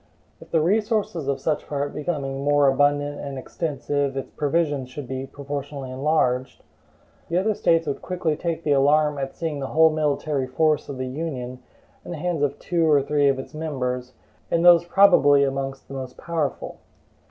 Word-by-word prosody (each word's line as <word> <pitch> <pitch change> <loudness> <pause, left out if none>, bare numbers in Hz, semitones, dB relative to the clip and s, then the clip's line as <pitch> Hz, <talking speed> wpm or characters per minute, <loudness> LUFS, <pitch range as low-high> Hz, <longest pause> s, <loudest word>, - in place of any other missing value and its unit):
If - - -14
the 160 - +2
resources 205 - 0
of 140 -1 0
such 150 +2 -2
part 145 -1 -3
becoming 140 -4 -3
more 145 0 +4
abundant 145 +1 +2
and 140 -2 -6
extensive, 145 -1 -2
its 135 - -5
provisions 145 -3 -1
should 135 0 -7
be 130 +1 -4
proportionally 140 -1 -6
enlarged, 130 -2 0 0.7
the 170 - 0
other 210 +4 +2
States 165 -4 +2
would 140 -2 -3
quickly 175 -4 -1
take 165 +1 -3
the 150 - 0
alarm 145 +1 +3
at 135 0 -4
seeing 160 -4 -3
the 135 - -3
whole 160 +2 +5
military 150 -2 -1
force 155 +3 +1
of 140 - -5
the 130 - -3
Union 130 -3 -5 0.4
in - - -11
the 175 - -4
hands 170 -1 -2
of 145 -1 0
two 170 -2 0
or 145 -2 +4
three 145 0 +2
of 135 -1 +2
its 130 - -8
members, 130 -5 -3 0.4
and 170 +1 +1
those 170 -1 +7
probably 170 -7 +5
amongst 135 0 -3
the - - -10
most 130 -1 -6
powerful. 160 -5 -3
145 Hz, 175 wpm, -24 LUFS, 135-160 Hz, 0.7 s, those